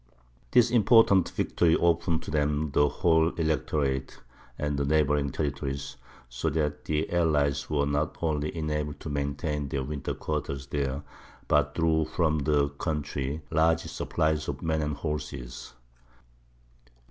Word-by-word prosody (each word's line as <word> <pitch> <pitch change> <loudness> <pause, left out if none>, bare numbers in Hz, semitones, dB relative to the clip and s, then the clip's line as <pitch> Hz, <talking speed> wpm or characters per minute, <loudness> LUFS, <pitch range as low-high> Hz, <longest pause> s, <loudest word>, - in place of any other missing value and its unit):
This 120 -1 +4
important 110 -5 +5
victory 80 -2 +2
opened 85 -1 +1
to - - -7
them 75 0 0
the 75 +1 +3
whole 80 +1 +3
Electorate 75 -4 -1 0.4
and 75 -1 -1
neighbouring 75 -2 +2
territories, 70 -1 -3 0.3
so - - -2
that 75 -1 -2
the 75 0 0
allies 75 -5 +1
were 75 -2 +1
not 75 +2 -1
only 75 -1 -1
enabled 75 -2 -2
to 75 - -6
maintain 70 +1 -2
their 70 0 -2
winter 70 0 -4
quarters 70 -1 -3
there, 70 0 -2 0.4
but - - +2
drew 80 -1 +2
from 80 0 +1
the 70 0 +2
country 75 0 -3
large 80 +1 +3
supplies 80 -1 -1
of - - -4
men 80 -1 0
and 75 -1 -1
horses. 70 -5 -5
75 Hz, 130 wpm, -28 LUFS, 70-80 Hz, 0.4 s, important